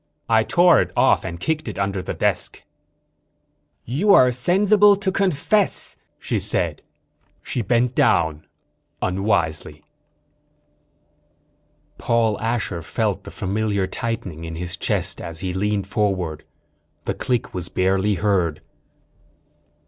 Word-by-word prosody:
"I 110 Hz, -1 st, +4 dB
tore 175 Hz, +9 st, +4 dB
it -, -, -3 dB
off -, -, +4 dB
and 85 Hz, 0 st, -6 dB
kicked 155 Hz, -, -2 dB
it 105 Hz, -, -5 dB
under 100 Hz, -1 st, -1 dB
the -, -, -5 dB
desk." -, -, -1 dB, 1.2 s
"You 170 Hz, -, +3 dB
are 125 Hz, -1 st, +6 dB
sensible 200 Hz, -, +4 dB
to 195 Hz, -1 st, -1 dB
confess," 195 Hz, +2 st, 0 dB, 0.2 s
she -, -, -2 dB
said. -, -, -1 dB, 0.6 s
She 125 Hz, -, -2 dB
bent 120 Hz, +2 st, +1 dB
down, 80 Hz, -8 st, +1 dB, 0.6 s
unwisely. 80 Hz, -6 st, -1 dB, 2.2 s
_Paul 115 Hz, -3 st, +1 dB
Asher 115 Hz, -6 st, -2 dB
felt -, -, -2 dB
the -, -, -7 dB
familiar 100 Hz, 0 st, -1 dB
tightening 95 Hz, -6 st, -4 dB
in 80 Hz, 0 st, -6 dB
his 90 Hz, +1 st, -3 dB
chest 95 Hz, 0 st, -1 dB
as 85 Hz, -2 st, -5 dB
he 95 Hz, -1 st, -3 dB
leaned 100 Hz, +1 st, -1 dB
forward. 95 Hz, -6 st, -2 dB, 0.6 s
The -, -, -1 dB
click 125 Hz, -3 st, -2 dB
was 90 Hz, -2 st, -4 dB
barely 95 Hz, +2 st, +1 dB
heard. 90 Hz, -5 st, 0 dB
100 Hz, 120 wpm, -22 LUFS, 90-125 Hz, 2.2 s, are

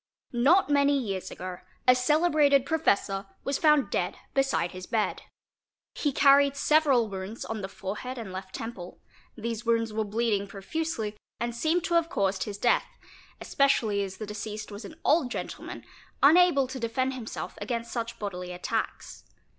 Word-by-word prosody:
Not 280 Hz, +11 st, +4 dB
many 285 Hz, 0 st, +3 dB
years 195 Hz, -7 st, -3 dB
ago 180 Hz, 0 st, -7 dB, 0.3 s
a 250 Hz, -, +9 dB
celebrated 290 Hz, +1 st, +3 dB
professor 200 Hz, -11 st, +1 dB, 0.2 s
was 275 Hz, -, -1 dB
found 300 Hz, -3 st, +4 dB
dead -, -, -1 dB, 0.2 s
beside 270 Hz, -10 st, +1 dB
his 185 Hz, -1 st, -8 dB
bed. 220 Hz, -2 st, 0 dB, 0.7 s
He 295 Hz, -, 0 dB
carried 280 Hz, +1 st, +5 dB
several 280 Hz, -5 st, +3 dB
wounds 195 Hz, +3 st, -6 dB
on 225 Hz, -1 st, -4 dB
the 190 Hz, -, -3 dB
fore 195 Hz, +1 st, -6 dB
head 255 Hz, +3 st, -6 dB
and 220 Hz, -5 st, -6 dB
left 190 Hz, 0 st, -7 dB
temple; 210 Hz, -6 st, -7 dB, 0.4 s
these 230 Hz, 0 st, -4 dB
wounds 230 Hz, -2 st, +1 dB
were 220 Hz, 0 st, 0 dB
bleeding 210 Hz, -1 st, 0 dB
profusely 215 Hz, +2 st, -3 dB, 0.2 s
and 235 Hz, +1 st, -2 dB
seemed 320 Hz, +7 st, +1 dB
to 345 Hz, -, -2 dB
have 335 Hz, -1 st, +3 dB
caused 195 Hz, -, 0 dB
his 205 Hz, -2 st, -5 dB
death, 240 Hz, +3 st, +2 dB, 0.5 s
especially 225 Hz, -7 st, +2 dB
as 190 Hz, -1 st, -6 dB
the 215 Hz, -, -5 dB
deceased 210 Hz, 0 st, -6 dB
was 205 Hz, +1 st, -8 dB
an -, -, -10 dB
old 295 Hz, -4 st, +3 dB
gentleman, -, -, -6 dB, 0.4 s
unable 310 Hz, -2 st, +6 dB
to 260 Hz, +1 st, -6 dB
defend 255 Hz, +3 st, -1 dB
himself 245 Hz, -4 st, -6 dB
against 235 Hz, -2 st, -3 dB
such 230 Hz, -1 st, -4 dB
bodily 180 Hz, -3 st, -5 dB
attacks. 180 Hz, -, -4 dB
235 Hz, 160 wpm, -28 LUFS, 205-280 Hz, 0.7 s, a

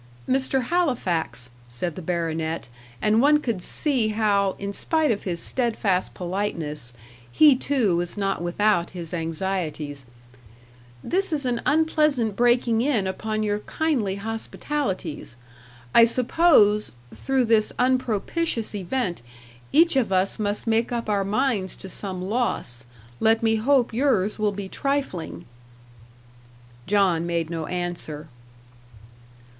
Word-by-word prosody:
"Mr. 265 Hz, 0 st, +1 dB
Halifax," 180 Hz, -, -1 dB, 0.2 s
said 150 Hz, +8 st, -4 dB
the -, -, -6 dB
baronet, 165 Hz, -1 st, -2 dB, 0.4 s
and 215 Hz, +2 st, +4 dB
one 295 Hz, +2 st, +5 dB
could 230 Hz, -10 st, -2 dB
see 260 Hz, -, 0 dB
how, 205 Hz, -3 st, +1 dB
in 200 Hz, 0 st, -5 dB
spite 315 Hz, +4 st, +1 dB
of 205 Hz, -, -3 dB
his 175 Hz, -3 st, -2 dB
steadfast 215 Hz, -5 st, 0 dB
politeness, 170 Hz, -, -3 dB, 0.4 s
he 295 Hz, -, +6 dB
too 255 Hz, -8 st, +1 dB
was 175 Hz, +3 st, -2 dB
not 195 Hz, -3 st, -1 dB
without 175 Hz, +1 st, +1 dB
his 170 Hz, 0 st, -6 dB
anxieties 160 Hz, -5 st, -3 dB, 1.0 s
"this 385 Hz, +1 st, 0 dB
is 290 Hz, -3 st, -1 dB
an 240 Hz, -2 st, -1 dB
unpleasant 300 Hz, -8 st, +2 dB
breaking 240 Hz, -1 st, +3 dB
in 245 Hz, -7 st, +1 dB
upon 215 Hz, +3 st, -2 dB
your 210 Hz, -1 st, 0 dB
kindly 240 Hz, -6 st, -1 dB
hospitalities. 220 Hz, -, -4 dB, 0.6 s
I 230 Hz, -, +8 dB
suppose, 235 Hz, -4 st, +3 dB, 0.2 s
through 265 Hz, -2 st, 0 dB
this 220 Hz, -2 st, +3 dB
unpropitious 250 Hz, -, 0 dB
event, 200 Hz, -, -2 dB, 0.5 s
each 330 Hz, +1 st, +5 dB
of 250 Hz, -7 st, +1 dB
us 190 Hz, +3 st, +1 dB
must 205 Hz, -1 st, -2 dB
make 225 Hz, +1 st, +1 dB
up 235 Hz, -2 st, -3 dB
our 200 Hz, -1 st, +1 dB
minds 205 Hz, -2 st, 0 dB
to 190 Hz, -, -9 dB
some 185 Hz, -1 st, -5 dB
loss. 185 Hz, -, -2 dB, 0.3 s
Let 225 Hz, +1 st, +3 dB
me 225 Hz, 0 st, +3 dB
hope 250 Hz, +1 st, +2 dB
yours 225 Hz, -6 st, +1 dB
will 210 Hz, -1 st, +2 dB
be 200 Hz, -1 st, -6 dB
trifling." 190 Hz, -, -3 dB, 1.4 s
John 185 Hz, -4 st, +2 dB
made 170 Hz, -1 st, -1 dB
no 160 Hz, -2 st, -3 dB
answer. 175 Hz, -4 st, -4 dB
210 Hz, 125 wpm, -24 LUFS, 180-250 Hz, 1.4 s, I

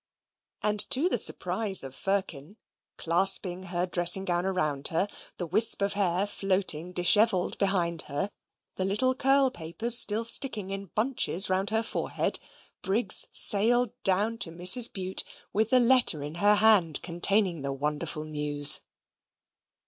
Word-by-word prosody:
And 210 Hz, 0 st, -2 dB
to 285 Hz, +7 st, +2 dB
the -, -, 0 dB
surprise 210 Hz, -7 st, +3 dB
of 135 Hz, -1 st, -10 dB
Firkin, 195 Hz, -1 st, -5 dB, 0.4 s
clasping 185 Hz, +1 st, +1 dB
her 175 Hz, -1 st, -3 dB
dressing 180 Hz, +1 st, +2 dB
gown 175 Hz, 0 st, -3 dB
around 155 Hz, -7 st, -3 dB
her, 170 Hz, +5 st, -2 dB, 0.3 s
the 175 Hz, -, -6 dB
wisp 215 Hz, +7 st, +1 dB
of 200 Hz, -, -2 dB
hair 195 Hz, -1 st, -2 dB
floating 185 Hz, -4 st, -2 dB
dishevelled 185 Hz, +2 st, +1 dB
behind 175 Hz, -5 st, -2 dB
her, 190 Hz, +9 st, -4 dB, 0.5 s
the 185 Hz, -, -3 dB
little 210 Hz, +7 st, -1 dB
curl 270 Hz, +1 st, 0 dB
papers 175 Hz, +8 st, -1 dB
still 220 Hz, -1 st, +2 dB
sticking 225 Hz, -4 st, +1 dB
in 195 Hz, 0 st, -8 dB
bunches 215 Hz, -3 st, -1 dB
round 190 Hz, +2 st, -2 dB
her 220 Hz, +1 st, -2 dB
forehead, 230 Hz, -, -2 dB, 0.4 s
Briggs 200 Hz, +2 st, +2 dB
sailed 230 Hz, +3 st, +4 dB
down 210 Hz, +4 st, -2 dB
to 210 Hz, -, -2 dB
Mrs. 180 Hz, +9 st, +4 dB
Bute 190 Hz, -1 st, -3 dB, 0.3 s
with 220 Hz, +2 st, -1 dB
the 255 Hz, -, +3 dB
letter 240 Hz, -, +3 dB
in 150 Hz, +1 st, -8 dB
her 205 Hz, +1 st, +3 dB
hand 205 Hz, -8 st, +2 dB
containing 180 Hz, 0 st, -1 dB
the 140 Hz, 0 st, -5 dB
wonderful 150 Hz, +3 st, -5 dB
news. 150 Hz, -1 st, +3 dB
190 Hz, 140 wpm, -25 LUFS, 170-215 Hz, 0.5 s, sailed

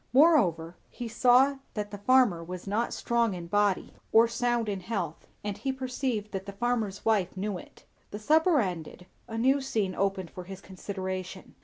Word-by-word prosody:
Moreover, 190 Hz, -, +4 dB
he 240 Hz, -, -6 dB
saw 250 Hz, +4 st, +4 dB, 0.2 s
that 210 Hz, -1 st, -3 dB
the 205 Hz, -, -7 dB
farmer 235 Hz, -7 st, +4 dB
was 180 Hz, +1 st, -7 dB
not 215 Hz, +4 st, -1 dB
strong 235 Hz, -4 st, 0 dB
in 175 Hz, -1 st, -6 dB
body 205 Hz, +1 st, +1 dB, 0.2 s
or 225 Hz, +1 st, +6 dB
sound 240 Hz, -1 st, 0 dB
in 200 Hz, -2 st, -2 dB
health, 180 Hz, -4 st, -4 dB, 0.2 s
and 205 Hz, -1 st, -3 dB
he 270 Hz, -, -1 dB
perceived 255 Hz, -5 st, -3 dB
that 195 Hz, 0 st, -5 dB
the 200 Hz, -, -6 dB
farmer's 220 Hz, -2 st, -1 dB
wife 200 Hz, -5 st, +1 dB
knew 195 Hz, -1 st, -2 dB
it. -, -, -16 dB, 0.2 s
The 205 Hz, -, -6 dB
supper 315 Hz, -, +3 dB
ended, 180 Hz, -4 st, -4 dB, 0.2 s
a 225 Hz, -1 st, -5 dB
new 265 Hz, +4 st, +3 dB
scene 215 Hz, -8 st, -1 dB
opened 195 Hz, -2 st, -1 dB
for 180 Hz, -, -8 dB
his 190 Hz, +1 st, -8 dB
consideration. 190 Hz, -1 st, -6 dB
205 Hz, 175 wpm, -28 LUFS, 190-240 Hz, 0.2 s, or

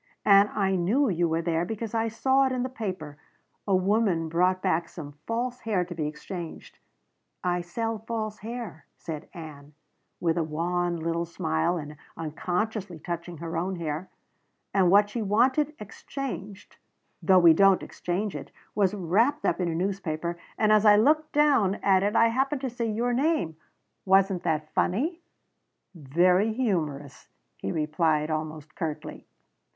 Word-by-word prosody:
"And 200 Hz, 0 st, +6 dB
I 195 Hz, -2 st, 0 dB
knew 225 Hz, +10 st, +2 dB
you 175 Hz, -2 st, +1 dB
were 165 Hz, +1 st, 0 dB
there 165 Hz, 0 st, 0 dB
because 220 Hz, +3 st, -5 dB
I 225 Hz, 0 st, +1 dB
saw 265 Hz, +4 st, +2 dB
it -, -, -2 dB
in 255 Hz, -1 st, -1 dB
the 255 Hz, -, -2 dB
paper. 185 Hz, -, -5 dB, 0.5 s
A 195 Hz, -, +3 dB
woman 185 Hz, -4 st, +1 dB
brought 180 Hz, +3 st, +2 dB
back 165 Hz, -1 st, 0 dB
some 150 Hz, -4 st, -8 dB, 0.2 s
false 245 Hz, +2 st, -2 dB
hair 200 Hz, -5 st, 0 dB
to 175 Hz, -, -7 dB
be 155 Hz, -3 st, -2 dB
exchanged 165 Hz, +3 st, -8 dB, 0.6 s
I 180 Hz, 0 st, 0 dB
sell 225 Hz, +6 st, -3 dB
false 215 Hz, -1 st, -4 dB
hair," 225 Hz, -7 st, -7 dB
said 160 Hz, -2 st, -7 dB
Ann, 150 Hz, -3 st, -10 dB, 0.4 s
with 170 Hz, 0 st, +1 dB
a -, -, +1 dB
wan 175 Hz, +3 st, -1 dB
little 165 Hz, +1 st, -1 dB
smile 160 Hz, -, -1 dB
and 150 Hz, -1 st, -7 dB, 0.2 s
unconsciously 180 Hz, +4 st, -3 dB
touching 170 Hz, +2 st, -6 dB
her 165 Hz, +2 st, -5 dB
own 185 Hz, +3 st, -1 dB
hair 165 Hz, +1 st, -4 dB, 0.6 s
"and 190 Hz, -3 st, +4 dB
what 205 Hz, +2 st, +5 dB
she 235 Hz, -, -3 dB
wanted 260 Hz, +9 st, +2 dB
exchanged 210 Hz, -2 st, -7 dB, 0.4 s
though 190 Hz, -1 st, +5 dB
we 170 Hz, -2 st, +8 dB
don't 195 Hz, +2 st, +5 dB
exchange 190 Hz, +4 st, -3 dB
it -, -, -7 dB, 0.2 s
was 200 Hz, -1 st, +2 dB
wrapped 220 Hz, -, +1 dB
up -, -, +1 dB
in 180 Hz, -, 0 dB
a 165 Hz, -, -2 dB
newspaper, 175 Hz, -2 st, -2 dB, 0.2 s
and 215 Hz, -1 st, +3 dB
as 215 Hz, -1 st, +5 dB
I 210 Hz, -1 st, +7 dB
looked 305 Hz, +8 st, +3 dB
down 275 Hz, -10 st, +3 dB
at 190 Hz, -1 st, +4 dB
it 205 Hz, +1 st, 0 dB
I 230 Hz, -, +5 dB
happened 265 Hz, +3 st, 0 dB
to 265 Hz, -3 st, -3 dB
see 235 Hz, -1 st, -2 dB
your 235 Hz, +3 st, 0 dB
name. 270 Hz, -, +1 dB, 0.5 s
Wasn't 190 Hz, -1 st, +3 dB
that 155 Hz, -3 st, -2 dB
funny?" 300 Hz, -, 0 dB, 0.7 s
"Very 180 Hz, +7 st, +2 dB
humorous," 155 Hz, -, -2 dB, 0.3 s
he 95 Hz, -, -4 dB
replied, 155 Hz, 0 st, +1 dB
almost 155 Hz, 0 st, -4 dB
curtly. 155 Hz, -1 st, -5 dB
185 Hz, 155 wpm, -27 LUFS, 165-220 Hz, 0.7 s, we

